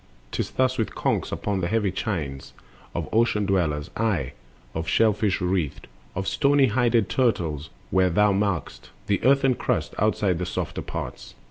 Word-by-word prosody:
'Tis -, -, -2 dB
thus 130 Hz, -1 st, +1 dB
with 110 Hz, -, -1 dB
conchs -, -, 0 dB
upon 100 Hz, -2 st, -2 dB
the 85 Hz, -, 0 dB
heavy 105 Hz, -1 st, +1 dB
chines 80 Hz, -, -4 dB, 0.4 s
Of -, -, -2 dB
ocean 110 Hz, -2 st, +3 dB
dwellers, 80 Hz, -7 st, 0 dB
aye, 105 Hz, -, 0 dB, 0.4 s
of 80 Hz, +1 st, -3 dB
shell 110 Hz, +5 st, +4 dB
fish 105 Hz, -1 st, 0 dB
wreathed, 90 Hz, -5 st, -1 dB, 0.3 s
Or 95 Hz, -, -2 dB
stony 140 Hz, +4 st, +3 dB
hided 120 Hz, -2 st, +2 dB
turtles, 85 Hz, -, 0 dB, 0.2 s
where 95 Hz, -1 st, +4 dB
thou 105 Hz, +3 st, +4 dB
mark'st 100 Hz, -5 st, -2 dB, 0.2 s
The 100 Hz, -2 st, 0 dB
earthen 135 Hz, +1 st, +4 dB
crust -, -, -1 dB
outside 100 Hz, -4 st, +1 dB
the 90 Hz, -, -1 dB
softer -, -, -3 dB
parts. -, -, -6 dB
100 Hz, 155 wpm, -25 LUFS, 90-115 Hz, 0.4 s, shell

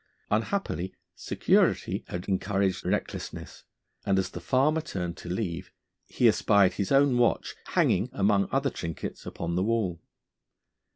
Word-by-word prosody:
Unhappily 105 Hz, -, -1 dB, 0.2 s
security -, -, +1 dB
had 90 Hz, 0 st, -5 dB
encouraged 95 Hz, -1 st, 0 dB
recklessness, -, -, -4 dB, 0.4 s
and 95 Hz, -, +2 dB
as 95 Hz, 0 st, 0 dB
the -, -, -6 dB
farmer 150 Hz, +5 st, +2 dB
turned 90 Hz, -, -4 dB
to -, -, -9 dB
leave 90 Hz, -3 st, -3 dB, 0.4 s
he -, -, +3 dB
espied 100 Hz, -3 st, +4 dB
his 100 Hz, +1 st, -3 dB
own 135 Hz, -2 st, +4 dB
watch 120 Hz, -, +2 dB, 0.2 s
hanging -, -, +3 dB
among 100 Hz, 0 st, +2 dB
other 135 Hz, 0 st, +1 dB
trinkets 80 Hz, -2 st, -6 dB
upon 85 Hz, 0 st, -4 dB
the 90 Hz, -, +1 dB
wall. 100 Hz, -6 st, 0 dB
100 Hz, 130 wpm, -28 LUFS, 90-120 Hz, 0.4 s, espied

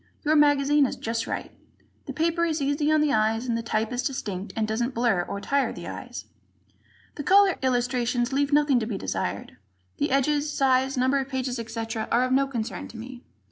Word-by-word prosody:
Your 310 Hz, +1 st, +3 dB
magazine 290 Hz, -1 st, +4 dB
is -, -, -5 dB
just 230 Hz, 0 st, -3 dB
right. -, -, -4 dB, 0.6 s
The -, -, -3 dB
paper 335 Hz, +2 st, 0 dB
is 325 Hz, -2 st, 0 dB
easy 290 Hz, +2 st, +1 dB
on 310 Hz, -1 st, +4 dB
the 300 Hz, -2 st, +2 dB
eyes 220 Hz, +2 st, +1 dB
and 235 Hz, -2 st, -1 dB
the 230 Hz, -, -1 dB
type 225 Hz, 0 st, -1 dB
is 245 Hz, -, -1 dB
distinct 210 Hz, -9 st, -4 dB
and 220 Hz, -1 st, 0 dB
doesn't 235 Hz, +4 st, -2 dB
blur 230 Hz, -6 st, +2 dB
or 200 Hz, +3 st, -5 dB
tire 275 Hz, +7 st, 0 dB
the -, -, -8 dB
eyes. -, -, -7 dB, 0.9 s
The 290 Hz, -, -4 dB
cover 390 Hz, +3 st, +5 dB
illustrations 245 Hz, -1 st, 0 dB
leave 280 Hz, +1 st, +1 dB
nothing 290 Hz, -3 st, +4 dB
to 220 Hz, -, -3 dB
be 215 Hz, -4 st, -3 dB
desired. 95 Hz, -, -4 dB, 0.4 s
The -, -, 0 dB
edges, 290 Hz, +2 st, +1 dB
size, 265 Hz, -1 st, +2 dB
number 260 Hz, +2 st, +2 dB
of 270 Hz, 0 st, -4 dB
pages, 260 Hz, -2 st, -2 dB
etc., 225 Hz, 0 st, -4 dB
are 245 Hz, -, +3 dB
of 255 Hz, -, -1 dB
no 275 Hz, +1 st, +3 dB
concern 235 Hz, -5 st, -4 dB
to -, -, -11 dB
me. 245 Hz, +2 st, -9 dB
255 Hz, 200 wpm, -25 LUFS, 230-285 Hz, 0.9 s, cover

